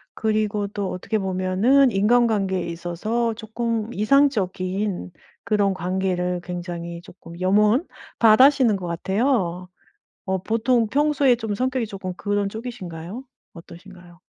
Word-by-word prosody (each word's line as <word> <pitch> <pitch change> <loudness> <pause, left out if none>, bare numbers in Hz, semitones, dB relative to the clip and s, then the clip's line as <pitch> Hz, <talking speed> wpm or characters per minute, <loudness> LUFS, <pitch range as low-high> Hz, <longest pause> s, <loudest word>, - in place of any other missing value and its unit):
그리고 215 -2 0
또 200 -2 -4
어떻게 215 +4 -2
보면은 190 +8 +2
인간관계에 205 -3 +2
있어서 180 +8 -2
쪼끔 225 0 -3
이상적인 205 -6 0 0.3
그런 205 -2 +2
관계를 180 0 -1
굉장히 175 -1 -6
쪼끔 170 -1 -13
염원 210 - +3 0.3
바라시는 240 +1 +6
것 180 -2 -6
같아요. 185 0 -1 0.6
어 190 0 0
보통 230 +1 +1
평소에 285 -1 +3
좀 220 -3 -3
성격이 255 +1 -1
쪼끔 195 -3 -6
그런 205 0 -1
쪽이신가요? 210 -2 -7 0.3
어떠신가요? 175 0 -14
205 Hz, 285 characters per minute, -23 LUFS, 180-230 Hz, 0.6 s, 바라시는